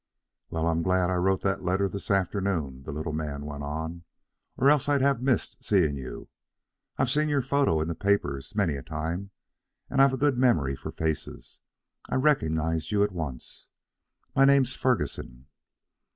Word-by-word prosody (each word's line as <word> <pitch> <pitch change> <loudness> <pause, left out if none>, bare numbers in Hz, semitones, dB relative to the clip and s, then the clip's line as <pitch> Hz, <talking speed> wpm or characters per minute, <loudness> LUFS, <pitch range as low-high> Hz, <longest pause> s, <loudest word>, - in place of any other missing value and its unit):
"Well, 80 0 -1
I'm 85 0 +1
glad 90 +1 +2
I - - +1
wrote 95 +1 +1
that 95 -1 0
letter 95 +2 +1
this 100 +1 -6
afternoon," 95 -8 0
the - - -5
little 75 +2 -4
man 75 -2 -4
went 75 -1 -6
on, 80 +4 -5 0.5
"or 135 - +3
else 145 -1 +4
I'd 140 -2 +3
have 135 -3 +2
missed 130 -4 0
seeing 85 -8 +2
you. 65 -2 -7 0.7
I've 130 -2 +1
seen 150 +2 +2
your 140 -3 +1
photo 140 - +2
in 80 - -1
the 85 - -1
papers 90 -4 -1
many 95 -7 +2
a 70 - -5
time, 80 +8 -4 0.6
and 135 0 +3
I've 135 -1 +5
a - - -1
good 140 -2 +2
memory 80 - +3
for - - -7
faces. 80 -2 -4 0.5
I - - -1
recognized 80 - +1
you 100 -1 +3
at 105 - 0
once. 75 -9 -6 0.7
My 135 - +5
name's 135 -2 +5
Ferguson." 65 - -2
90 Hz, 170 wpm, -27 LUFS, 80-125 Hz, 0.7 s, I've